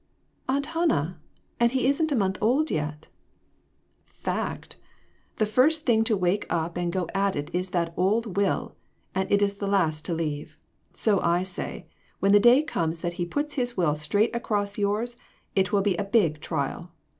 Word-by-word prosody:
"Aunt 280 +2 +1
Hannah! 310 - 0 0.4
And 235 +1 +3
he 260 -1 +1
isn't 295 +4 +2
a - - +2
month 190 -4 0
old 265 +9 +2
yet! 150 0 -3 0.4
" - - -41 0.2
" - - -42
Fact! - - -5 0.6
The 215 - +2
first 290 +9 +3
thing 225 -3 +4
to 220 -2 +2
wake 185 +2 0
up' 170 0 -1
and 175 -1 -1
go 180 -1 -1
at 195 0 +1
it 145 0 -5
is 180 +1 -1
that 170 -2 -1
old 205 +2 +1
will; 200 0 0 0.4
and 190 0 -1
it 205 0 +4
is 200 0 0
the 200 - -3
last 165 -6 +1
to 170 - -1
leave. 150 -3 -4 0.3
So 205 -4 +2
I 170 +1 +2
say, 185 0 -5 0.3
when 195 - +3
the 205 - +7
day 240 +7 +6
comes 165 - -2
that 175 -1 -2
he - - +1
puts 295 - -2
his 245 -4 -2
will 170 -5 +2
straight 205 +10 0
across 205 -3 -1
yours, 215 +4 -1 0.4
it 190 -1 +1
will 200 -1 +2
be 195 -3 +2
a - - 0
big 195 -7 +2
trial. 165 +2 -3
200 Hz, 190 wpm, -26 LUFS, 175-235 Hz, 0.6 s, the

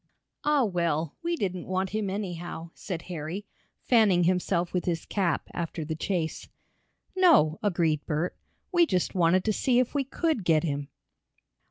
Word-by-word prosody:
"Ah, 295 -2 +3
well, 170 -6 0
we 340 +1 0
didn't 185 - -3
want 185 0 -1
him 210 -1 -1
anyhow," 175 -4 -5
said 175 -4 -6
Harry, 175 +3 -5 0.4
fanning 210 -8 +4
himself 180 0 +1
with 180 - -1
his 170 -2 -1
cap, 180 -7 0
after 165 -2 -4
the 160 - -3
chase. 160 -1 -2 0.7
"No," 320 - +5
agreed 170 -7 +1
Bert, 160 +3 -1 0.4
"we 345 -2 +4
just 180 - 0
wanted 180 0 +3
to 215 - +1
see 245 +4 +2
if 250 -1 +2
we 285 -2 +1
could 290 - -1
get 160 -3 +3
him." 145 -3 -2
180 Hz, 155 wpm, -27 LUFS, 165-210 Hz, 0.7 s, No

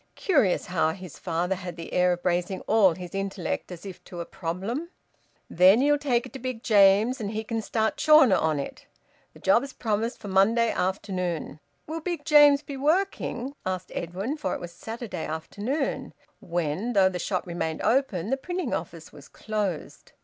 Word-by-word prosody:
Curious, 275 - +2
how 160 -3 +1
his 180 -3 -10
father 175 +3 -1
had 180 -2 -6
the 165 -1 -8
air 180 0 +3
of 175 - -7
bracing 180 +1 0
all 200 -6 +4
his 180 -1 -9
intellect 195 -2 -3
as 175 +2 -9
if 190 -2 -9
to 175 - -9
a 170 - -4
problem! 195 - -4 0.6
"Then 185 +5 +6
ye'll 290 +2 +3
take 245 -5 +1
it - - -12
to 265 - -7
Big 255 -2 -5
James, 210 +4 +4
and 205 - -2
he 220 +1 -3
can 225 0 -3
start 220 +1 -1
Chawner 305 -9 +6
on 160 -3 +1
it. 140 - -7 0.5
Th' - - -20
job's 240 +8 +3
promised 225 +1 -1
for 210 - -10
Monday 220 +5 +3
forenoon." 180 -5 -2 0.3
"Will 320 +2 -4
Big 335 -3 -4
James 295 -2 +6
be 280 -1 -7
working?" 290 -4 0
asked 185 -1 -4
Edwin, 195 - -3
for 300 - -2
it - - -5
was 175 - -7
Saturday 225 -2 -6
afternoon, 210 - -3 0.2
when, 175 +7 -2
though 195 -3 +5
the 180 -1 -3
shop 185 +2 -2
remained 165 -2 -3
open, 225 -6 +1
the 270 - +2
printing 355 +6 -3
office - - -5
was - - -13
closed. 210 -7 -4
200 Hz, 180 wpm, -26 LUFS, 180-255 Hz, 0.6 s, Then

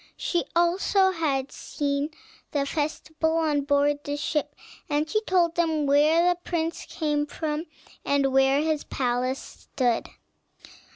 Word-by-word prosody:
She 345 - 0
had - - -4
also 375 +3 +3 0.4
seen 285 0 -2 0.4
the 285 -2 +1
festival 315 +2 -1
on 305 -3 +1
board 285 +1 +2 0.2
ship, 295 0 -2 0.3
and 295 +1 +1
she 430 +7 0
told 355 -5 +2
them 320 -3 +1
where 305 +5 +4
the 355 -1 +2
prince 335 -1 -2
came 295 -2 -1
from, 305 +2 -3 0.4
and 275 -1 +1
where 270 +1 +4
his 310 -2 0
palace 255 0 -1
stood. 245 -3 -2
300 Hz, 125 wpm, -26 LUFS, 285-330 Hz, 0.4 s, where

